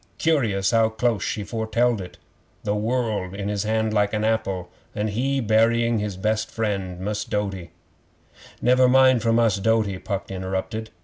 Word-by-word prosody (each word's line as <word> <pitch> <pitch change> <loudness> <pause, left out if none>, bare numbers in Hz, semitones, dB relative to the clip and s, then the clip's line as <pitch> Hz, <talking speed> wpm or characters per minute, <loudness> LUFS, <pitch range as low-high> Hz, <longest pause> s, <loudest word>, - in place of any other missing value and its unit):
Curious 115 -12 +1
how 115 -1 +3
close 110 -1 0
she 105 - -2
foretelled 115 +1 0
it! 90 - -10 0.5
The 105 - 0
world 110 -3 -1
in 100 0 -3
his 105 0 -2
hand 110 0 0
like 105 -1 +1
an 105 0 0
apple, 100 -5 -1 0.2
an' 105 +1 -1
he 135 +6 0
burying 115 0 +2
his 105 -3 -4
best 110 +2 -1
friend, 100 -5 -3
Mus' 105 +3 -2
Doughty 95 -4 -3 0.5
' - - -23
'Never 125 +1 +5
mind 130 -2 +5
for 115 +1 +1
Mus' 115 -2 +3
Doughty,' 105 -2 +1
Puck 100 -1 -4
interrupted. 95 +4 -4
110 Hz, 165 wpm, -23 LUFS, 100-115 Hz, 0.5 s, Never